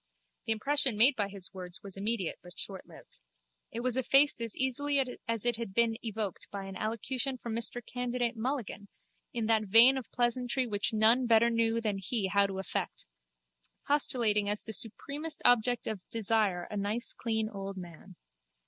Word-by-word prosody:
The - - +2
impression 270 +1 +2
made 255 +6 +6
by 205 -4 0
his 195 -2 -10
words 180 -1 -8
was 195 -2 -6
immediate 200 -2 -2
but 180 0 -12
shortlived. 190 - -8 0.5
It 235 - -4
was 250 0 0
effaced 270 +1 +3
as 230 -2 -2
easily 280 +2 0 0.3
as 230 -1 -2
it 240 -2 +2
had 230 -5 -6
been 235 -1 +2
evoked 215 -4 -4
by 200 -1 -6
an 195 0 -8
allocution 250 +6 -2
from 235 -2 -5
Mr 235 0 -1
Candidate 245 -1 -2
Mulligan 225 -4 -4 0.4
in 235 -6 -2
that 220 -1 +2
vein 235 +6 +8
of 245 - -12
pleasantry 245 +1 0
which 205 -3 -1
none 225 +3 +4
better 230 0 +4 0.3
than 210 -3 -2
he 210 +4 -2
knew 190 - 0
how 200 0 +4
to 195 -1 -6
affect, 190 - -4 0.8
postulating 230 -8 +1
as 210 0 -1
the 220 - -6
supremest 290 +9 -2
object 245 0 +3
of 215 -4 -4
desire 215 -5 +1
a 210 - -4
nice 210 +4 -1
clean 220 -2 -2
old 195 -2 -7
man. 175 +1 -11
225 Hz, 170 wpm, -30 LUFS, 200-245 Hz, 0.8 s, vein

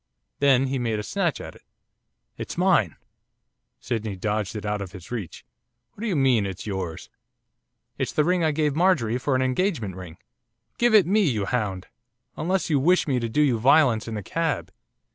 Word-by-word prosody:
Then 135 -2 +4
he 135 0 -2
made 115 -3 -1
a 105 - -4
snatch - - -1
at - - -8
it. - - -18 0.7
'It's - - -7
mine!' 175 - +2 0.8
Sydney 110 -3 -3
dodged 105 +1 -2
it 105 - -5
out 105 -1 -2
of 95 -3 -7
his 90 +2 -11
reach. 110 -9 -6 0.5
'What - - -14
do 230 - -2
you 195 - 0
mean, 130 -7 +3
it's 95 -2 -7
yours?' 95 -6 -5 0.9
'It's - - -1
the 150 - +2
ring 180 +2 +1
I 160 - +3
gave 150 -1 0
Marjorie 150 -10 +2
for 135 +1 0
an 130 - +2
engagement 130 - -1
ring. 90 -3 -10 0.6
Give 240 -2 +4
it 205 - +7
me, 205 +5 +2
you 105 -6 -1
hound! 100 -5 -2 0.5
unless 185 +3 -1
you 150 -4 +2
wish 180 +6 +3
me 130 -3 +1
to 115 -1 -3
do 150 +7 +2
you 125 -6 +2
violence 125 -3 +4
in 115 - -4
the 105 - -5
cab. 160 - -2
125 Hz, 190 wpm, -24 LUFS, 105-155 Hz, 0.9 s, it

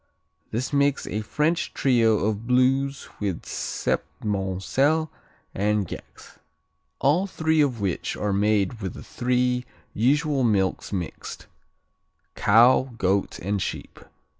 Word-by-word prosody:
This 125 +5 -3
makes 140 0 +2
a 105 - -3
French 150 +10 -1
trio 115 -6 +3
of 110 +1 -2
Blues 135 +2 +2
with 100 -5 -2
Septmoncel 105 - -1 0.4
and 105 0 0
Gex, - - -11 0.6
all 165 +8 +2
three 160 -4 +1
of 130 -6 +1
which 95 -4 -2
are 105 -1 -1
made 105 +2 +1
with 95 -2 -4
the - - -9
three 125 0 0 0.3
usual 140 - +2
milks 100 -5 +1
mixed: 90 -5 -5 0.9
cow, 120 +3 +4
goat 95 -1 0
and 100 +3 -2
sheep. - - -5
115 Hz, 115 wpm, -25 LUFS, 100-135 Hz, 0.9 s, cow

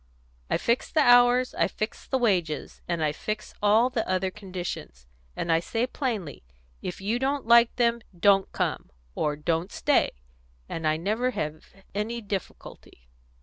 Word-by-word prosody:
I - - +2
fix 235 +1 0
the 310 - +3
hours, 245 0 +5
and - - +2
I - - 0
fix 215 +1 -5
the 265 - +1
wages, 180 - 0
and 170 -2 -1
I 150 - +2
fix 215 +7 -5
all 220 +5 +4
the 230 -6 -2
other 185 0 0
conditions, 180 - -7 0.3
and 170 - -2
I 165 - +4
say 225 +7 -1
plainly, 230 - -3 0.4
'If 180 - -5
you 220 +5 0
don't 275 +1 -1
like 235 0 +6
them, 235 -1 +2 0.2
'don't 195 0 +4
come,' - - -2 0.2
or 150 - -1
'don't 165 +4 -1
stay,' - - +2 0.5
and 160 -1 -3
I 155 0 +2
never 215 +9 0
have 155 -9 -4 0.3
any 215 +4 -2
difficulty." 195 - -7
205 Hz, 160 wpm, -26 LUFS, 170-235 Hz, 0.5 s, like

